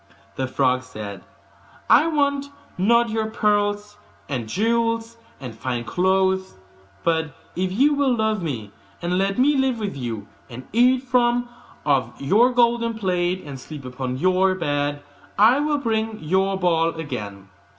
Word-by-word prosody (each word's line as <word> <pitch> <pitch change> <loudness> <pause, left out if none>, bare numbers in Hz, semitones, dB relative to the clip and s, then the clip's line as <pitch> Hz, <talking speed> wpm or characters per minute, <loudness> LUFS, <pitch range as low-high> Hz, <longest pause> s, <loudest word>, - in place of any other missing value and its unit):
The 130 - -2
frog 130 0 +1
said, 105 -6 -8 0.6
'I 315 - +6
want 280 -3 +1 0.3
not 235 +5 +3
your 220 0 -1
pearls, 210 -1 0 0.3
and 120 -6 -4
jewels, 230 - 0 0.2
and 125 -4 -7
fine 120 +1 -3
clothes; 190 +4 +1 0.5
but 160 -3 0 0.2
if 185 0 -1
you 275 +9 +3
will 280 -3 +2
love 220 -2 0
me, 120 -11 -4 0.3
and 180 +2 0
let 195 0 0
me 285 +4 +4
live 265 -2 +1
with 210 -6 -4
you 115 -6 -5 0.2
and 130 +1 -9
eat 250 +3 +4
from 245 -1 +2 0.4
off 130 -5 +1
your 210 - +4
golden 235 -1 +2
plate, 185 -3 -1
and 140 -2 -7
sleep 145 0 -9
upon 125 0 -4
your 185 +4 +2
bed, 145 -4 -2 0.3
I 225 +7 +6
will 295 0 +1
bring 225 -4 -1
you 155 - -9
your 195 0 0
ball 165 -3 +1
again. 105 -11 -6
190 Hz, 150 wpm, -22 LUFS, 140-230 Hz, 0.6 s, I